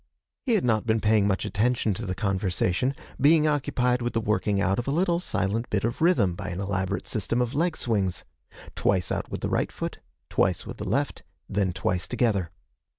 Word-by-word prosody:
He 240 - +3
had 195 - +1
not 110 -1 +1
been 110 0 +3
paying 105 -2 +3
much 95 -2 0
attention 115 0 +1
to 95 - -5
the 95 - -2
conversation, 95 +4 0 0.2
being 150 +3 +5
occupied 125 -4 +1
with 120 0 -2
the 115 - +1
working 105 -2 0
out 100 +1 +1
of 120 - -4
a - - +1
little 170 +2 +2
silent 110 - -1
bit 100 -2 0
of 115 +5 -2
rhythm 160 - +4
by 85 - -6
an 90 +1 -4
elaborate 95 -1 -2
system 120 - 0
of 125 +1 0
leg 165 +3 0
swings: 100 -6 -1 0.5
twice 95 -4 +1
out - - -2
with - - -5
the - - -1
right - - 0
foot; - - -5 0.3
twice 90 -3 +1
with - - -7
the - - -4
left; - - -1 0.3
then 100 -2 0
twice 90 0 -1
together. 110 -8 +1
110 Hz, 200 wpm, -26 LUFS, 95-125 Hz, 0.5 s, being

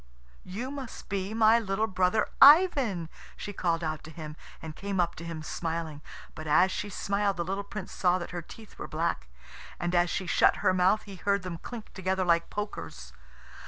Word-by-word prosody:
"You 230 +9 -5
must 275 -4 -8
be 195 0 -2
my 225 +1 +6
little 210 -1 0
brother 190 +1 +1
Ivan," 275 - +7 0.3
she 205 - -6
called 170 -3 0
out 155 -1 -3
to - - -10
him, 155 -2 -8 0.2
and 160 -1 -8
came 200 -1 -3
up 170 -1 +2
to 170 - -7
him 165 -2 -6
smiling. 160 -2 -4 0.3
But 155 0 -8
as 180 +5 +4
she 205 - -3
smiled 200 0 -1
the 170 - -1
little 195 +2 -2
Prince 200 -1 -7
saw 180 -1 +2
that 175 - -6
her 175 -1 -4
teeth 220 +6 -14
were - - -5
black; - - -2 0.5
and 175 +1 -2
as 175 0 +3
she 190 - -2
shut 165 - +4
her - - +5
mouth 185 +4 +3
he 200 -2 -10
heard 200 0 0
them 175 -2 -5
clink 230 +2 -9
together 190 0 -1
like 170 -1 +2
pokers. 65 - -6
185 Hz, 195 wpm, -29 LUFS, 170-205 Hz, 0.5 s, Ivan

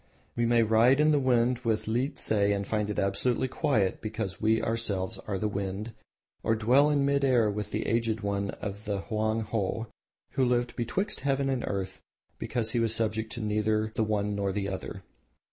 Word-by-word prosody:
We 120 0 +1
may 120 -1 +4
ride 115 +4 +5
the 150 0 +4
wind 125 -2 +2
with 110 -3 -1
Liehtse 130 +5 -1
and 100 -1 +2
find 105 -1 -1
it 105 - -3
absolutely 115 +6 +1
quiet 125 - 0
because 110 -3 -4
we 110 +1 +3
ourselves 105 -5 -1
are 100 -2 -1
the 105 - -1
wind, 100 +2 -4 0.5
or 115 - +1
dwell 125 +7 +4
in 145 -2 +2
mid 140 0 +2
air 120 -6 +3
with 105 0 -4
the 110 - -2
Aged 115 -1 0
one 100 -1 -1
of 100 0 -6
the 100 -2 -2
Hoang 110 +1 -1
Ho, 110 +1 -2 0.5
who 135 - +1
lived 120 -1 +1
betwixt 190 - -2
Heaven 135 0 0
and 130 -2 -1
Earth 95 -2 -4 0.4
because 115 -3 -2
he 120 - 0
was 115 -1 +2
subject 110 0 -1
to 120 - -5
neither 110 +1 0
the 115 - +1
one 105 -1 0
nor 100 -1 -1
the 100 0 -2
other. 95 - -6
110 Hz, 185 wpm, -28 LUFS, 105-120 Hz, 0.5 s, ride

